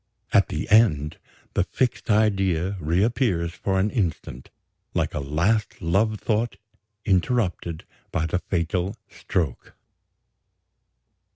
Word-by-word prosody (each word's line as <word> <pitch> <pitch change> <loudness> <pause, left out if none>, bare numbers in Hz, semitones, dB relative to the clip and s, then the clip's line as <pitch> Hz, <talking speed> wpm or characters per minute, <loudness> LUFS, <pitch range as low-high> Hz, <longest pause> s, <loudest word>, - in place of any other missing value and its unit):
At - - +5
the - - -3
end, 75 -10 +4 0.4
the - - +2
fixed 125 -2 -1
idea 95 -4 +2
reappears 90 - +1
for 95 +1 -1
an 100 +3 +1
instant, 80 - -3 0.5
like - - 0
a - - -2
last 85 +10 0
love 100 +5 +1
thought 115 +1 0 0.5
interrupted 90 -4 0 0.3
by 80 - 0
the 85 +3 0
fatal 90 +2 -1 0.2
stroke. 80 -9 -3
95 Hz, 105 wpm, -24 LUFS, 85-110 Hz, 0.5 s, At